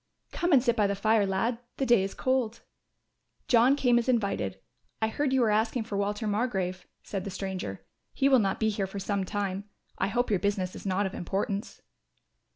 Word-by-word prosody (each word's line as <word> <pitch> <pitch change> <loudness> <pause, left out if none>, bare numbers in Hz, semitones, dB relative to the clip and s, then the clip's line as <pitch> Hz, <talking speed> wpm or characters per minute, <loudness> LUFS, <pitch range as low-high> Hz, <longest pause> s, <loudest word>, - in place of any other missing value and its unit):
"Come 350 0 -1
and 265 -5 +6
sit 235 -3 +2
by 210 -3 +3
the 200 - -1
fire, 215 0 +2
lad, 225 +5 0 0.2
the 270 - 0
day 240 -5 +5
is 195 0 -3
cold." 255 -3 0 0.9
John 245 +3 +5
came 245 -4 +3
as 240 - -2
invited. 195 - 0 0.4
"I 220 - +1
heard 280 +4 -1
you 260 -2 +3
asking 220 +2 +1
for 215 -2 -6
Walter 205 +2 -1
Margrove," 200 -4 -1 0.2
said 195 -3 -4
the 200 - -5
stranger, 185 - -5 0.3
"he 275 - +2
will 265 -2 +6
not 195 -3 0
be 220 - +2
here 200 -2 -1
for 195 - -8
some 195 0 -1
time. 200 0 -3 0.3
I 195 - +2
hope 245 +3 0
your 200 - +3
business 195 -2 -1
is - - -7
not 195 +2 +1
of 190 - -3
importance." 200 +3 -3
205 Hz, 195 wpm, -28 LUFS, 195-240 Hz, 0.9 s, and